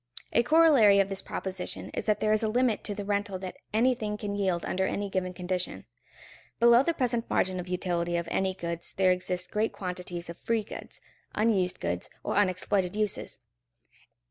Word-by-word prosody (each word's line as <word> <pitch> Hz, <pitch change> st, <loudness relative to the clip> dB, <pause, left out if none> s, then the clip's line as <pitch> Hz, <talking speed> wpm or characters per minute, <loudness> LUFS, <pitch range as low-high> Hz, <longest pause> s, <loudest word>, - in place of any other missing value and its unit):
A -, -, +5 dB
corollary 275 Hz, -8 st, +6 dB
of 195 Hz, 0 st, +2 dB
this 195 Hz, -1 st, -3 dB
proposition 190 Hz, -1 st, -4 dB
is -, -, -3 dB
that 210 Hz, -1 st, +2 dB
there 215 Hz, -, +2 dB
is 215 Hz, -, +2 dB
a 220 Hz, -, +1 dB
limit 240 Hz, 0 st, +1 dB
to 205 Hz, -, -2 dB
the 205 Hz, -, -5 dB
rental 200 Hz, -1 st, -1 dB
that 185 Hz, 0 st, -7 dB
anything 220 Hz, -2 st, +1 dB
can 205 Hz, -1 st, -4 dB
yield 190 Hz, -4 st, 0 dB
under 190 Hz, 0 st, 0 dB
any 200 Hz, -1 st, -3 dB
given 185 Hz, -1 st, -1 dB
condition. 180 Hz, 0 st, -3 dB, 0.7 s
Below 235 Hz, +1 st, +7 dB
the 335 Hz, +4 st, 0 dB
present 240 Hz, -4 st, 0 dB
margin 185 Hz, 0 st, +1 dB
of 180 Hz, -, -6 dB
utility 175 Hz, -1 st, -1 dB
of 170 Hz, 0 st, -3 dB
any 190 Hz, -1 st, 0 dB
goods 170 Hz, -2 st, -4 dB
there 185 Hz, -1 st, +5 dB
exist 180 Hz, 0 st, -2 dB
great 215 Hz, +1 st, 0 dB
quantities 180 Hz, -2 st, -5 dB
of 170 Hz, 0 st, -8 dB
free 230 Hz, -2 st, 0 dB
goods, -, -, -9 dB, 0.3 s
unused 205 Hz, -5 st, +1 dB
goods, -, -, -3 dB
or -, -, -2 dB
unexploited 185 Hz, -1 st, +1 dB
uses. 210 Hz, -2 st, 0 dB
195 Hz, 180 wpm, -28 LUFS, 180-215 Hz, 0.7 s, Below